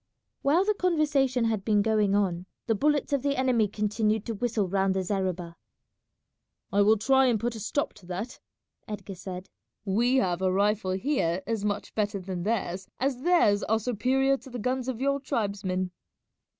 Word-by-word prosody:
While 320 +7 +3
the 425 - +3
conversation 295 - +1
had 220 -3 0
been 210 -1 +3
going 210 -2 +2
on, 185 -3 0 0.2
the 225 - +2
bullets 290 +5 +1
of 280 - +2
the 280 +1 0
enemy 250 -5 +2
continued 215 +1 0
to 230 - -3
whistle 220 -2 -1
round 190 +1 +1
the 190 - 0
zareba. 185 -3 -2 1.2
"I 200 - +4
will 215 +2 +5
try 265 +5 +4
and 235 -4 +2
put 240 +2 -1
a 225 - -7
stop 285 +7 -2
to 175 - -17
that," 195 +7 -5 0.5
Edgar 205 -2 -6
said; 185 0 -7 0.4
"we 235 +6 +2
have 185 -8 +1
a 185 -1 +2
rifle 200 0 +1
here 190 - 0
as 225 -3 -2
much 205 0 -2
better 210 -1 -1
than 185 -1 -5
theirs, 190 -2 -2
as 260 -1 -1
theirs 275 - +4
are 220 0 +1
superior 260 +4 +1
to 265 - -14
the 250 - -6
guns 255 +2 -2
of 255 -3 -3
your 280 +1 +1
tribesmen." 200 -7 -2
215 Hz, 175 wpm, -27 LUFS, 195-255 Hz, 1.2 s, will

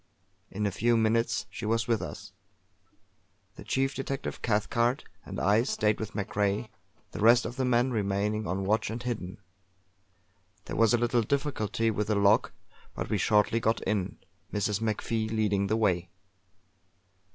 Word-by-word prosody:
In 105 +2 -3
a 100 - +1
few 115 +5 +2
minutes 110 0 +1
she - - -8
was 115 +2 0
with 115 -2 +1
us; - - -8 1.2
the - - -10
chief 135 +1 0
detective, 135 0 -4
Cathcart, 115 +3 +1 0.2
and - - -6
I 105 +3 +4
stayed 110 -4 0
with 110 -1 -5
MacRae, 105 +1 -1 0.4
the - - -7
rest 115 +3 +5
of 120 - -5
the 130 0 0
men 125 +1 +2
remaining 105 0 -1
on 95 +2 -2
watch 110 +2 +1
and 115 +2 -5
hidden. 110 -5 -4 1.3
There - - -5
was 115 +1 +4
a - - +2
little 120 0 +2
difficulty 115 -4 0
with 105 0 -2
the 105 - +1
lock, 100 +1 +3 0.4
but - - -4
we - - +1
shortly 110 +2 +3
got 110 0 +1
in, 100 -4 -1 0.3
Mrs. 105 0 -1
MacFie 110 0 -1
leading 105 -3 +1
the 110 +2 +1
way. 90 -5 +1
110 Hz, 155 wpm, -29 LUFS, 105-115 Hz, 1.3 s, rest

